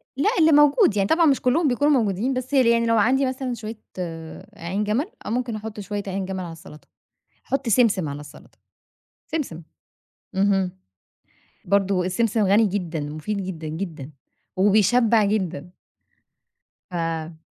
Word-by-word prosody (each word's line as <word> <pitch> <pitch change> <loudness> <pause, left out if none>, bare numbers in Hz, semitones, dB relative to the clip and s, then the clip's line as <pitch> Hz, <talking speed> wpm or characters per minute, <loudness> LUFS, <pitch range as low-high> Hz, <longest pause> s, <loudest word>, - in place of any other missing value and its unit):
لأ، 285 +10 +2
اللي 320 0 +5
موجود، 295 - +5
يعني 195 -1 +2
طبعًا 335 +1 +4
مش 280 -4 +3
كلهم 290 +6 +2
بيكونوا 285 +3 +2
موجودين 215 +5 0
بس 255 +2 -4
يعني 235 -3 +4
لو 230 0 +2
عندي 260 +6 +3
مثلًا 260 -1 -3
شوية 220 -1 -7 0.8
عين 185 +5 -2
جَمل 215 +8 0 0.2
أو - - -4
ممكن 240 -1 -2
أحُط 215 0 -7
شوية 205 0 -4
عين 195 0 -3
جَمل 190 0 -4
على 170 - -7
السلطة. 160 -2 -13 0.6
أحُط 275 -2 -2
سمسم 205 -7 +3
على 140 +1 -6
السلطة. 150 0 -15 0.7
سمسم، 255 - -3 0.7
اهم. 195 -1 +2 0.9
برضه 195 -2 +1
السمسم 215 +4 0
غني 210 +3 +4
جدًا، 180 -5 -3
مفيد 155 +8 -4
جدًا، 165 -4 -6
جدًا، 155 -4 -6 0.5
وبيشبع 215 +3 +4
جدًا. 185 -4 -2 1.2
ف 165 -2 -3
205 Hz, 140 wpm, -23 LUFS, 180-245 Hz, 1.2 s, اللي